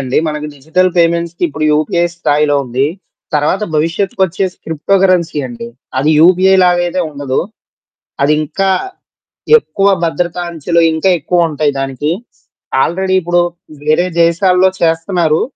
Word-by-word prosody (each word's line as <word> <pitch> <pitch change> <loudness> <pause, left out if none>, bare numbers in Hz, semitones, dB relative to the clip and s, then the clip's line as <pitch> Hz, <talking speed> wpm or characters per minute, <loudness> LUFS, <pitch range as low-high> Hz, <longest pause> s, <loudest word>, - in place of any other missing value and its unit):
అండి. 130 -1 0
మనకి 150 0 -4
డిజిటల్ 160 +6 0
పేమెంట్స్‌కి 170 0 0
ఇప్పుడు 155 +1 -4
యూపీఐ 155 +3 +1
స్థాయిలో 150 -3 +1
ఉంది. 125 +3 0 0.5
తర్వాత 150 +7 +1
భవిష్యత్తుకొచ్చేసి 185 +3 -1
క్రిప్టోకరెన్సీ 175 0 +1
అండి. 120 -1 -8 0.3
అది 150 +4 +2
యూపీఐ 185 +3 +5
లాగైయితే 175 0 +1
ఉండదు. 140 -2 -2 0.8
అదింకా 155 +6 0 0.9
ఎక్కువ 200 - -1 0.2
భద్రతా 170 +2 -1
అంచలో 170 +1 -1
ఇంకా 160 +4 +1
ఎక్కువుంటాయి 155 -2 0
దానికి. 135 +2 -2 0.7
ఆల్రెడి 190 +2 -1
ఇప్పుడు 175 0 +1 0.4
వేరే 155 +4 +2 0.2
దేశాల్లో 180 +2 +3
చేస్తున్నారు. 165 -1 +1
165 Hz, 110 wpm, -14 LUFS, 150-180 Hz, 0.9 s, యూపీఐ